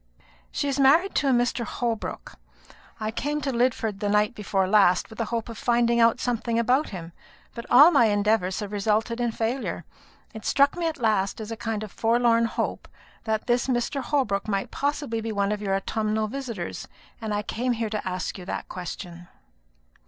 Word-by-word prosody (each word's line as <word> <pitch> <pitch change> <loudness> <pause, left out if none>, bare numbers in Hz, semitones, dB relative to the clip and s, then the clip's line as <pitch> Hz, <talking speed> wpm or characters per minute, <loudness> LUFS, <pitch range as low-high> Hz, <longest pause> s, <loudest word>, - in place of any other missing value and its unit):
"She 285 - -2
is 280 0 -1
married 320 +9 +5
to 280 - +1
a - - +4
Mr. 245 0 +1
Holbrook. 230 -1 -4 0.7
I 215 0 -2
came 295 +6 -2
to 275 -1 -1
Lidford 235 -4 0
the 205 -1 -1
night 210 +1 +2
before 195 -3 -1
last, 195 -1 +4
with 220 - -11
the 230 - 0
hope 230 +1 -3
of 230 -2 -8
finding 235 -1 +2
out 230 +1 +4
something 235 -2 -1
about 250 +6 +2
him; 170 -3 -7 0.4
but 235 - -8
all 290 +7 +8
my 235 - +5
endeavours 205 -2 +1
have 205 -1 -5
resulted 215 +3 0
in 240 -1 +1
failure. 230 +4 -3 0.5
It 220 -1 -9
struck 280 0 +3
me 345 -1 -1
at 320 - -3
last, 215 -6 0
as 220 0 -6
a - - -3
kind 220 -1 -3
of 210 - -8
forlorn 230 0 +3
hope, 230 - -3 0.4
that 220 -1 -1
this 245 0 +1
Mr. 255 +2 0
Holbrook 255 -9 0
might 195 -2 -2
possibly 285 -5 -2
be 225 0 -3
one 200 -1 0
of 210 0 -2
your 195 -2 0
autumnal 215 +2 -1
visitors; 255 -1 -5 0.3
and 220 -1 -3
I 210 0 -1
came 245 +4 -1
here 225 -2 -3
to 215 -3 -3
ask 185 +1 -3
you 180 - -9
that - - -5
question." 175 -1 -7
225 Hz, 190 wpm, -25 LUFS, 210-245 Hz, 0.7 s, all